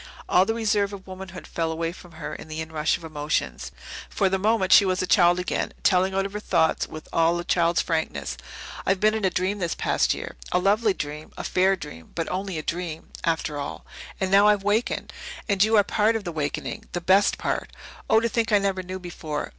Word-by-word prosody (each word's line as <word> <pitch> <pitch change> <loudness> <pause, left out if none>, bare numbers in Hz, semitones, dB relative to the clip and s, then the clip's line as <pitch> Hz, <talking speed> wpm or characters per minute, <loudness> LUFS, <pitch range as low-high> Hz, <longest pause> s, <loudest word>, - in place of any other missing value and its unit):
All 185 - +5
the 225 - 0
reserve 205 -3 +1
of 195 -1 -9
womanhood 190 -1 -9
fell 165 -1 -2
away 165 +1 -2
from 175 -1 -14
her 160 -1 -6
in - - -8
the 155 0 -6
inrush 160 -1 0
of - - -16
emotions. 150 - -2 0.4
For 195 - +1
the 190 0 0
moment 210 -2 +2
she - - +9
was 185 -1 0
a - - +1
child 175 -1 +5
again, 180 - -2
telling 190 +1 +3
out 195 0 0
her 210 - -4
thoughts 165 -6 +1
with 155 - -9
all 165 +1 +3
a 175 - -3
child's 170 -1 +2
frankness. 160 - -2 0.5
"I've 190 -1 +1
been 215 +2 +4
in 220 -2 -1
a - - +4
dream 185 +3 -1
this 170 -3 -1
past - - +1
year - - -7
a - - +3
lovely 205 +2 +2
dream 150 +1 -6
a - - -5
fair 190 +1 +3
dream, 115 - -10
but 165 -1 -2
only 190 -1 -3
a 155 - -4
dream, 170 -1 -4
after 160 -3 -1
all. 140 - -6 0.3
And 190 -1 -1
now 200 +1 +6
I've 205 -2 +3
wakened. 210 +4 0 0.3
And 200 -3 +3
you 220 +1 +4
are 205 - +6
part 215 +3 +2
of 225 - -2
the 175 - -4
wakening 150 -3 -3
the 175 - -1
best 190 +3 +4
part! - - -2 0.4
Oh, 220 - +6
to 230 - +1
think 230 -1 0
I 210 - +6
never 195 -2 0
knew 185 +1 -6
before!" 165 -4 -5
185 Hz, 220 wpm, -25 LUFS, 165-200 Hz, 0.5 s, she